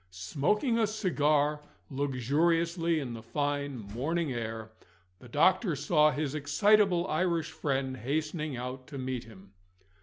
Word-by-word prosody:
Smoking 155 - 0
a 220 - +3
cigar 150 -8 +1 0.3
luxuriously 165 +5 +1
in 130 -5 -5
the 115 - -7
fine 145 +4 -2
morning 130 +9 -2
air, 110 -1 -5 0.5
the 125 - -14
doctor 170 - +3
saw 150 +2 +3
his 150 -2 -2
excitable 180 +5 +3
Irish 165 -1 0
friend 135 -2 -2
hastening 150 +3 -2
out 125 +1 -6
to 145 - -8
meet 130 -2 -4
him. 100 -3 -15
145 Hz, 125 wpm, -30 LUFS, 130-165 Hz, 0.5 s, a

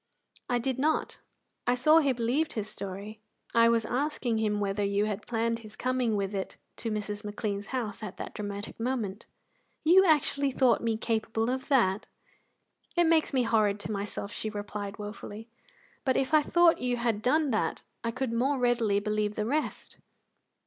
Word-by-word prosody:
"I 245 - +2
did 260 +2 -2
not. 310 +3 0 0.5
I 245 - +4
saw 305 +6 +6
he 285 -4 +2
believed 250 +6 0
his 215 -2 -3
story. 205 +1 -7 0.3
I 230 0 +6
was 230 -1 +2
asking 255 -4 -1
him 210 -1 +1
whether 200 0 -1
you 200 +1 +1
had 210 -1 -4
planned 230 0 0
his 215 -2 -12
coming 250 -2 0
with 200 0 -1
it 195 -1 -4 0.2
to 230 - -3
Mrs. 210 0 -3
McLean's 205 -1 -3
house 230 -6 -3
at 210 -3 -6
that - - -6
dramatic 205 0 -6
moment." 225 -4 -2 0.6
"You 355 +4 +7
actually 290 -4 +3
thought 255 -2 +3
me 230 -1 0
capable 225 +1 -1
of 260 0 -3
that!" 215 -8 +2 0.9
"It 345 - +5
makes 325 -1 +3
me 260 -2 +2
horrid 215 -3 +2
to 215 - -5
myself," 200 0 -4
she 215 - -4
replied 205 -1 -5
wofully, 210 +1 -8 0.5
"but 260 -2 +2
if 270 +3 0
I 310 - +7
thought 345 +2 +4
you 245 -1 0
had 230 -3 0
done 290 +4 +2
that 215 - -1 0.2
I 230 - 0
could 250 0 -2
more 265 +4 +1
readily 235 -5 +2
believe 210 0 -1
the 210 - -1
rest." 295 +6 -2
230 Hz, 175 wpm, -29 LUFS, 210-260 Hz, 0.9 s, You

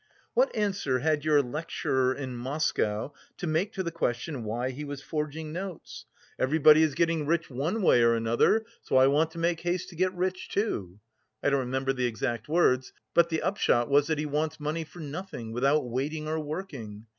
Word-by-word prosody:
"What - - +2
answer 195 - 0
had 150 +2 +1
your 150 -2 +4
lecturer 130 -2 -1
in 130 -3 -5
Moscow 125 -2 -1 0.2
to - - -4
make 170 +6 0
to 190 - -2
the 170 - -3
question 130 -4 -2
why 120 +4 -2
he 140 +4 -6
was 145 -1 -5
forging 155 0 -4
notes? 185 -1 -7 0.3
'Everybody 155 +2 +6
is 155 -4 +2
getting 165 -2 +1
rich 165 -1 0
one 160 - -1
way 125 - +5
or 115 0 +5
another, 115 - +2 0.2
so - - +1
I 130 - +7
want 150 +4 +3
to - - -10
make 165 0 +1
haste 175 +2 -2
to 175 - -12
get 185 +2 +1
rich 185 +1 -2
too.' 100 - -2 0.4
I 145 - +3
don't 140 - +3
remember 130 +1 -1
the 125 -1 0
exact 120 +2 -3
words, 130 -6 +2 0.2
but 170 0 +5
the 160 -1 -1
upshot 120 -11 +2
was 145 +1 +4
that 160 -1 0
he 150 - -2
wants 150 +2 -1
money 155 +2 -2
for 175 +2 -12
nothing, 145 -6 -6
without 135 +4 +2
waiting 145 +6 -3
or 160 +1 -1
working! 140 - -6
150 Hz, 190 wpm, -28 LUFS, 130-165 Hz, 0.4 s, I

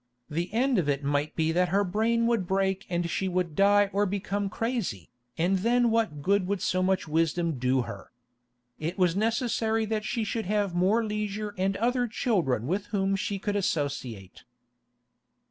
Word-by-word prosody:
The 170 +4 -2
end 245 +1 +2
of 150 -4 0
it 140 0 0
might 145 +2 -1
be 160 0 +1
that 180 +2 +2
her 200 +3 +2
brain 225 +5 +1
would 230 -6 +1
break 190 0 0
and 175 -1 -1
she 190 +3 -1
would 180 -4 -1
die 200 +1 +4
or 205 +1 +2
become 200 +1 -2
crazy, 215 - -3 0.3
and 180 +3 +2
then 240 +3 +3
what 215 -11 0
good 200 +1 +2
would 200 0 -1
so 185 0 0
much 185 -1 +1
wisdom 165 -1 0
do 130 0 +2
her? 115 0 -9 0.7
It 165 +4 -3
was 180 -3 +2
necessary 225 0 0
that 215 0 -2
she 210 +3 -1
should 220 -1 -3
have 205 -2 0
more 195 +6 +2
leisure 210 0 -3
and 190 +1 0
other 245 +2 +1
children 175 - 0
with 195 +8 -2
whom 195 -2 0
she 200 +1 -2
could 205 +1 -2
associate. 135 - -3
195 Hz, 175 wpm, -27 LUFS, 170-215 Hz, 0.7 s, die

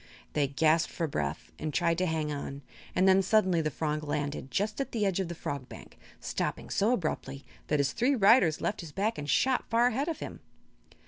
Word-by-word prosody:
They 145 -2 +2
gasped 155 +3 +2
for 170 - -2
breath 150 - -3
and 155 - -3
tried 170 +1 +1
to 185 - +1
hang 155 -2 -1
on, 140 -1 -5 0.3
and 190 - +4
then 190 0 +6
suddenly 190 -4 +3
the 155 - 0
frog 155 +1 -2
landed 145 -2 -3
just 210 - -1
at 275 - -5
the 215 -3 +1
edge 195 -1 +1
of 190 - -1
the 170 - -6
Fog 140 -5 -5
Bank, - - -12 0.2
stopping - - -3
so 215 +5 +2
abruptly 145 - -3 0.2
that 150 - +1
his 140 -2 +1
three 270 +4 +2
riders 200 - +5
left 205 - -1
his 165 -3 -9
back 205 +6 -1
and 145 0 -5
shot 260 - +2
far 230 +1 +4
ahead 265 +6 -1
of 330 - -2
him. - - -7
170 Hz, 210 wpm, -29 LUFS, 150-210 Hz, 0.3 s, then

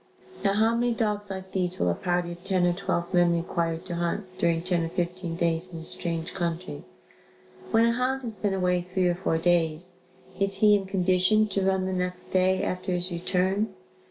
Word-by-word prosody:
Now 195 -1 +3
how 220 +2 +3
many 240 0 +1
dogs 210 -3 -1
like 190 -1 -6
these 180 -1 -1
will 90 - +2
a - - +1
party 175 - -1
of 175 +1 -10
ten 185 -2 +1
or 175 - +3
twelve 175 -1 -2
men 175 -1 +4
require 170 -1 -1
to 175 +1 -7
hunt, 185 +2 -3
during 165 -1 +1
ten 180 -2 +1
or 165 - -2
fifteen 175 0 -2
days 170 +1 -1
in 170 - -7
a 165 - -7
strange 165 0 -1
country? 175 0 -3 0.9
When 225 0 +4
a 235 - +3
hound 255 +3 -1
has 225 -3 0
been 200 0 -1
away 180 -1 +1
three 180 +1 0
or 175 - +2
four 175 -2 -1
days, 175 +1 +1 0.4
is 195 0 0
he 210 +1 +5
in 200 -2 +1
condition 190 +3 +4
to 195 0 -1
run 190 0 +1
the 190 - -2
next 180 0 -3
day 185 0 +2
after 185 0 -2
his 180 +1 -2
return? 185 +4 0
180 Hz, 205 wpm, -26 LUFS, 175-195 Hz, 0.9 s, he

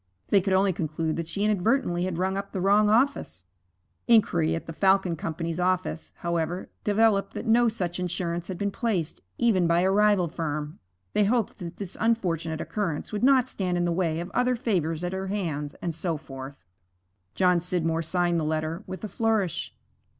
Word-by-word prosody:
They 200 - +5
could 190 +1 0
only 190 0 +3
conclude 160 -2 -2
that 165 -1 -3
she 200 +4 -3
inadvertently 210 -3 +1
had 185 -3 -3
rung 190 +2 0
up 200 0 -5
the 190 - -2
wrong 205 +3 +4
office. 230 - +1 0.6
Inquiry 170 -8 +4
at 165 - -5
the 165 - -7
Falcon 190 -1 +3
Company's 165 +2 -4
office, 180 -2 -1
however, 170 +1 -2
developed 210 -1 +2
that - - -4
no 235 +1 +4
such 180 -5 -3
insurance 175 -1 -2
had 185 - -5
been 200 +1 -1
placed, 195 -8 -2 0.2
even 200 -8 +3
by 170 +1 +3
a 190 +1 +3
rival 205 -3 +4
firm. 150 -2 -4 0.3
They 210 - +3
hoped 225 0 0
that 175 -2 -7
this 195 -3 -7
unfortunate 170 -8 0
occurrence 190 -8 -3
would 210 +1 -3
not 260 -1 +5
stand 185 -7 -2
in 175 - +1
the 175 - +1
way 165 -2 0
of 175 +2 -6
other 250 +1 +2
favors 175 -9 -1
at 175 +1 -2
her 190 0 -3
hands, 160 -8 -3
and 170 - -1
so 165 0 -2
forth. 135 - -10 0.7
John 180 -2 +4
Scidmore 165 -2 -1
signed 175 +1 +1
the - - -1
letter 155 +4 -2
with 190 - -7
a - - -2
flourish. 215 -3 0
180 Hz, 185 wpm, -26 LUFS, 165-205 Hz, 0.7 s, They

